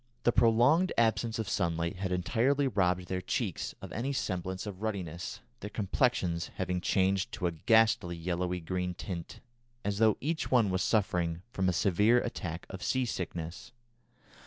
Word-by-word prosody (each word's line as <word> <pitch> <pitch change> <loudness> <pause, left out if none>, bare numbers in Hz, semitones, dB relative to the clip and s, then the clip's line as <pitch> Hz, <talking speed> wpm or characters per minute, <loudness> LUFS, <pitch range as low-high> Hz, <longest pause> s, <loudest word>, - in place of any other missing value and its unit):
The 120 - +4
prolonged 120 +11 +4
absence 115 0 +2
of 110 -3 -3
sunlight 85 -2 -1
had 95 0 -3
entirely 115 +11 +2
robbed 90 -5 +1
their 90 0 -3
cheeks - - -2
of - - -7
any 125 +6 -2
semblance 95 -5 -3
of 100 -2 -7
ruddiness, 100 0 -4 0.2
their 105 - -6
complexions 95 -5 0
having 90 -1 -2
changed 95 +1 +1
to 90 - -3
a 85 - +2
ghastly 100 0 +3
yellowy 90 +1 -2
green 90 +1 -2
tint, 85 -2 -6 0.4
as 100 0 -1
though 110 -2 +4
each 155 +3 -2
one 115 -6 +4
was 95 0 0
suffering 90 -6 +1
from 95 -4 +1
a - - +3
severe 105 +7 +3
attack 85 -7 -4
of 95 - -8
sea 130 +4 +1
sickness. 90 +1 -5
95 Hz, 160 wpm, -31 LUFS, 90-115 Hz, 0.4 s, The